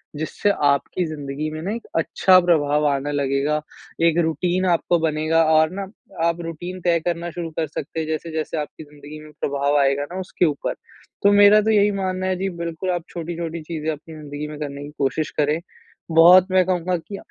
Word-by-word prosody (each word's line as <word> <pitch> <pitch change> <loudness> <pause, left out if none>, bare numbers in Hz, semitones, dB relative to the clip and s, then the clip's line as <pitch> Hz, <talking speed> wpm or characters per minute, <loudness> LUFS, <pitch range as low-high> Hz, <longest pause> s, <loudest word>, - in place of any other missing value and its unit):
जिससे 160 +6 -1 0.2
आपकी 145 +5 +1
जिंदगी 150 -1 -4
में 155 0 -6
ना 195 +5 -3
एक 230 +1 -6
अच्छा 185 +3 +4
प्रभाव 150 -4 +2
आने 140 +1 -1
लगेगा। 140 +2 0 0.5
एक 165 - +2
रूटीन 175 +3 0
आपका 170 +1 +2
बनेगा 160 0 +1
और 155 0 +5
ना 195 - -4 0.4
आप 170 +1 -1
रूटीन 175 +2 -6
तय 170 -1 +2
करना 170 0 -2
शुरू 170 -1 -5
कर 160 - 0
सकते 150 +2 -6
हैं 155 - -3
जैसे-जैसे 160 0 -3
आपकी 150 +1 -5
ज़िंदगी 150 +1 -12
में 155 - -13
प्रभाव 140 +1 +1
आएगा 140 0 +2
ना 190 - -4
उसके 180 -1 0
ऊपर। 145 -3 -1 0.5
तो 200 - +6
मेरा 205 +1 +7
तो 220 +1 +1
यही 205 -1 +4
मानना 185 -1 -2
है। 185 - 0
जी, 195 +1 -2
बिल्कुल, 170 +1 -5
आप 175 -2 -2
छोटी-छोटी 170 -1 -5
चीज़े 155 -1 -4
अपनी 155 +1 -9
ज़िंदगी 150 0 -6
में 150 0 -8
करने 140 -1 -5
की 145 - -9
कोशिश 145 +3 -1
करें। 150 +2 +2 0.5
बहुत 175 +3 +7
मैं 185 -1 +4
कहूँगा 180 0 0
की 180 +5 -8
160 Hz, 190 wpm, -22 LUFS, 150-180 Hz, 0.5 s, मेरा